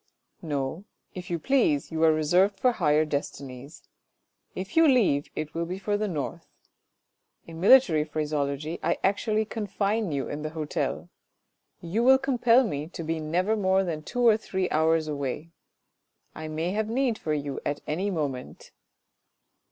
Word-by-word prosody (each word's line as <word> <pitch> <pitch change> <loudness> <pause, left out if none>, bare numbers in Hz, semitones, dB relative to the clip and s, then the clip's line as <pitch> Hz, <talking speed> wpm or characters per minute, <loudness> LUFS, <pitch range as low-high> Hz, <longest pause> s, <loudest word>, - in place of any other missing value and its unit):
" - - -47 0.2
No, 140 +8 -4 0.3
if 180 -1 -8
you 170 - -1
please, 165 - +1
you 160 0 -1
are 160 - +6
reserved 180 +6 +2
for 250 - +4
higher 150 -8 +2
destinies. 140 -1 -6 0.7
If 190 +2 -6
you 325 0 +6
leave 210 - +3
it 155 -1 -4
will 170 0 -2
be 180 +2 -4
for 205 +1 -1
the 210 +1 -1
North.... 150 -8 -4 1.0
In 165 -1 -10
military 195 - +6
phraseology 150 0 -3
I 170 - 0
actually 215 +2 +1
confine 210 -2 -2
you 140 -2 -2
in 145 - -5
the 155 - -3
hotel. 155 -2 -3 0.7
You 180 +7 -1
will 265 +1 +7
compel 255 -2 +3
me 145 -4 -4
to 170 -1 -7
be 160 0 -2
never 180 +7 0
more 190 -2 +2
than 165 -4 -3
two 245 +9 -2
or 220 -2 +6
three 190 -4 -2
hours 160 0 +2
away. 145 +2 -4 0.8
I 155 - -7
may 160 +3 -2
have 215 +2 -1
need 245 -1 0
of 155 -1 0
you 140 -2 -4
at 145 0 -3
any 180 +7 -1
moment." 145 -8 -4
165 Hz, 160 wpm, -27 LUFS, 150-210 Hz, 1.0 s, will